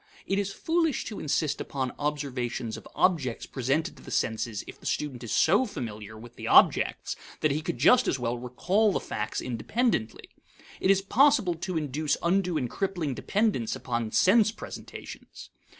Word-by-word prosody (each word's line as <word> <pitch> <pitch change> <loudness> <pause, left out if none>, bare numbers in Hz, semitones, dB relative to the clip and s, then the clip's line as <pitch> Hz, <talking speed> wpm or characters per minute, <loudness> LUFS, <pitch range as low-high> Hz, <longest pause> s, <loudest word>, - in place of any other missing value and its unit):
It 195 +1 0
is 200 -1 -2
foolish 325 +4 0
to 215 - -6
insist 150 0 0
upon 130 -3 -3
observation 135 -5 -2
of 110 - -7
objects 140 -10 +1
presented 135 +4 -1
to - - -14
the - - -11
senses 110 -1 -1
if - - -11
the - - -7
student 130 -5 -2
is 115 - -6
so 205 +10 +4
familiar 110 - -7
with 120 +2 -13
the - - -5
objects - - +4 0.3
that 155 - +3
he 150 +3 -1
could 155 - -3
just 175 - +5
as - - +1
well 120 -1 -1
recall 180 - +1
the - - 0
facts 105 0 -3
independently. 125 - -1 0.5
It - - +1
is 195 0 +4
possible 240 -3 +4
to 170 +1 -4
induce 150 0 -1
undue 180 -1 +2
and 130 -4 -1
crippling 175 -2 -2
dependence 200 - 0
upon 120 -3 -2
sense 215 - +5
presentations. - - -10
150 Hz, 165 wpm, -28 LUFS, 120-195 Hz, 0.5 s, just